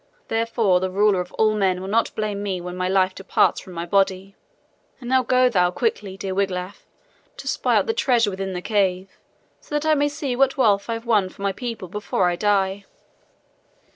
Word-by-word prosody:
Therefore 225 -4 +1
the 185 +1 -2
Ruler 200 0 +2
of 180 - -8
all 215 -1 +2
men 190 -3 +1
will 190 - -6
not 225 +3 0
blame 210 -2 -2
me 195 -3 -2
when 180 0 -7
my 185 0 -1
life 190 -1 +2
departs 195 - +1
from 185 - -12
my 170 0 -4
body. 195 +1 0 0.6
"And 245 - -9
now 260 +1 +3
go 255 +1 +3
thou 180 -7 +2
quickly, 200 - -2
dear 195 -1 -4
Wiglaf, 190 0 -3 0.5
to - - -9
spy - - +1
out - - +3
the 450 - 0
treasure 245 - +2
within 190 0 -4
the 180 0 -5
cave, 195 -3 -1 0.4
so 295 - -7
that 295 +1 -1
I 315 - +4
may 290 -1 +2
see 290 -3 -3
what 270 +2 +2
wealth 205 -5 +2
I - - 0
have 230 +1 -8
won 210 -5 +2
for 200 - -11
my 200 - +1
people 230 -3 -6
before 190 -1 -1
I - - -2
die." 200 0 0
200 Hz, 205 wpm, -22 LUFS, 185-230 Hz, 0.6 s, I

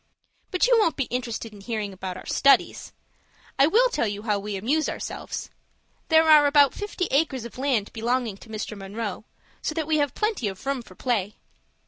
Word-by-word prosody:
"But 365 - +2
you - - +5
won't 335 -7 +2
be 275 - 0
interested 235 -2 -4
in 205 - -12
hearing 210 -2 -3
about 185 -1 -6
our - - -11
studies. 280 - +3 0.7
I 275 - +7
will 470 +9 +4
tell 235 - 0
you 205 0 -5
how 210 -3 0
we 205 0 -5
amuse 280 +10 0
ourselves. - - -6 0.6
There 320 0 +5
are 300 -2 +7
about 285 -1 +5
fifty 410 -3 -3
acres 270 -4 +1
of 235 - -10
land 255 -7 0
belonging 235 -2 -1
to 220 - -15
Mr. 215 0 -5
Munroe; 205 +1 -5 0.4
so 310 - -3
that 320 -2 -1
we 310 0 +1
have 290 -3 0
plenty 425 - -1
of 190 +3 -7
room 275 -2 -1
for - - -16
play. 210 -5 -1
245 Hz, 190 wpm, -25 LUFS, 210-305 Hz, 0.7 s, I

